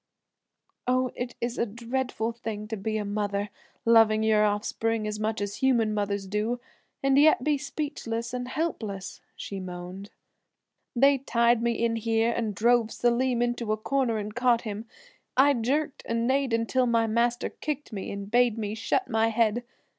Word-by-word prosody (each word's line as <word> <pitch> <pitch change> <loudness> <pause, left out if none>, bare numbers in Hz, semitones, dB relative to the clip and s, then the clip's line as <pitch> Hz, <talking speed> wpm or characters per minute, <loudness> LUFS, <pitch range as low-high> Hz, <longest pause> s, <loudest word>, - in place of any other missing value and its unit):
"Oh, 255 0 +2
it 245 0 -5
is 240 +1 -3
a - - +2
dreadful 235 +1 -2
thing 225 -2 -6
to 220 - -2
be 215 +2 -2
a 210 - -2
mother, 205 0 -2 0.3
loving 225 -1 +5
your 215 -1 +4
offspring 215 +2 0
as 210 0 -3
much 215 0 -1
as 205 0 -3
human 235 -5 +2
mothers 200 -1 -1
do, 210 +5 -1 0.4
and 275 0 +4
yet 295 -4 +5
be 295 -1 +1
speechless 265 -5 -4
and 250 0 -3
helpless," 225 - -4
she 195 - -6
moaned. 180 +2 -7 0.9
"They 275 +2 +5
tied 235 -2 +2
me 235 0 +1
in 230 0 0
here 225 +1 +1
and 225 -3 -2
drove 235 +1 +3
Selim 240 0 +1
into 240 -2 -1
a 215 - +1
corner 240 0 0
and 210 0 -4
caught 245 -1 +3
him. 215 0 -5 0.5
I 280 +2 +6
jerked 275 +4 -1
and 230 0 0
neighed 270 -1 +1
until 230 +3 +1
master 235 +1 +1
kicked 295 -4 -5
me 195 - -4
and 200 0 -6
bade 240 -2 +3
me 210 -2 -3
shut 225 - 0
my 225 0 +2
head. 225 +1 +1
230 Hz, 165 wpm, -27 LUFS, 215-245 Hz, 0.9 s, I